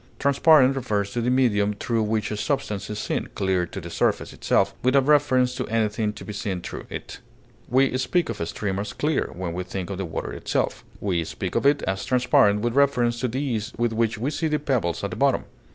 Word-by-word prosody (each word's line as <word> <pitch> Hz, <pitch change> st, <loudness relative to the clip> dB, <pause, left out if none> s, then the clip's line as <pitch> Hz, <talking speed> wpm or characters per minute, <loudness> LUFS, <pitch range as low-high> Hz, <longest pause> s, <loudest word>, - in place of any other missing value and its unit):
Transparent 140 Hz, -1 st, +5 dB
refers 105 Hz, -6 st, -1 dB
to 120 Hz, -, -2 dB
the 120 Hz, -, 0 dB
medium 105 Hz, -5 st, +2 dB
through 115 Hz, +2 st, -1 dB
which 110 Hz, 0 st, -1 dB
a -, -, -1 dB
substance 105 Hz, -5 st, -2 dB
is 105 Hz, -, -4 dB
seen, -, -, -2 dB
clear 95 Hz, -2 st, 0 dB
to 95 Hz, -, -7 dB
the 85 Hz, -1 st, -8 dB
substance -, -, 0 dB
itself, 95 Hz, 0 st, +1 dB
without 130 Hz, +1 st, +3 dB
reference 135 Hz, -4 st, +3 dB
to -, -, -4 dB
anything 110 Hz, -1 st, 0 dB
to -, -, -10 dB
be 105 Hz, -, -6 dB
seen 100 Hz, -3 st, -3 dB
through -, -, -7 dB
it; -, -, -7 dB, 0.5 s
we 130 Hz, +1 st, +3 dB
speak 170 Hz, +7 st, +1 dB
of 115 Hz, -5 st, -5 dB
a 85 Hz, -, -1 dB
stream 100 Hz, -2 st, -3 dB
as 100 Hz, 0 st, -4 dB
clear 150 Hz, 0 st, 0 dB
when 90 Hz, -1 st, -4 dB
we 90 Hz, +1 st, -3 dB
think 95 Hz, +1 st, -5 dB
of 95 Hz, -, -5 dB
the 95 Hz, -, -2 dB
water 80 Hz, -, -5 dB
itself; -, -, -2 dB, 0.2 s
we 90 Hz, -5 st, 0 dB
speak -, -, -5 dB
of -, -, +2 dB
it 145 Hz, 0 st, +3 dB
as 95 Hz, 0 st, -2 dB
transparent 125 Hz, -5 st, +3 dB
with 120 Hz, 0 st, 0 dB
reference 125 Hz, -4 st, +2 dB
to 125 Hz, -, 0 dB
the 125 Hz, +3 st, -3 dB
ease 115 Hz, -6 st, -2 dB
with 120 Hz, -1 st, 0 dB
which 115 Hz, 0 st, 0 dB
we 130 Hz, +7 st, -2 dB
see 160 Hz, +1 st, -1 dB
the 150 Hz, -1 st, +1 dB
pebbles 125 Hz, -, -1 dB
at -, -, -2 dB
the -, -, -4 dB
bottom. -, -, +2 dB
115 Hz, 225 wpm, -24 LUFS, 100-130 Hz, 0.5 s, Transparent